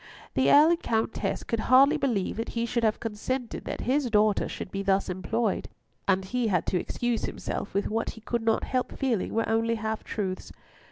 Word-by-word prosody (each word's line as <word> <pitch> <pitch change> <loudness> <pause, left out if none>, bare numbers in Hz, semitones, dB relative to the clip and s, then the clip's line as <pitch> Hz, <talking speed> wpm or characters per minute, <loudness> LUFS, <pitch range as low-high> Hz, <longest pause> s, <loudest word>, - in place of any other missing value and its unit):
The 130 +1 +3
Earl 305 +3 +7
and 345 0 +1
Countess 225 -5 -1
could 230 - -2
hardly 275 +4 +7
believe 240 -12 -1
that 225 - -3
he 230 - +1
should 235 0 -1
have 215 -1 +2
consented 235 +3 -4
that - - -4
his 265 0 +1
daughter 210 -1 +3
should - - -6
be 195 - -3
thus 195 0 +1
employed, 195 +4 -1 0.4
and 190 -1 +2
he 245 +4 -1
had 180 -5 +1
to 180 - +3
excuse 240 +4 -1
himself 200 - -5
with 200 - +1
what 225 +1 -1
he - - -11
could 235 +1 -2
not 225 0 +1
help 255 -1 -2
feeling 250 -8 0
were 225 - +1
only 225 +1 +1
half 220 0 -3
truths. 190 -3 -4
225 Hz, 200 wpm, -27 LUFS, 200-245 Hz, 0.4 s, Earl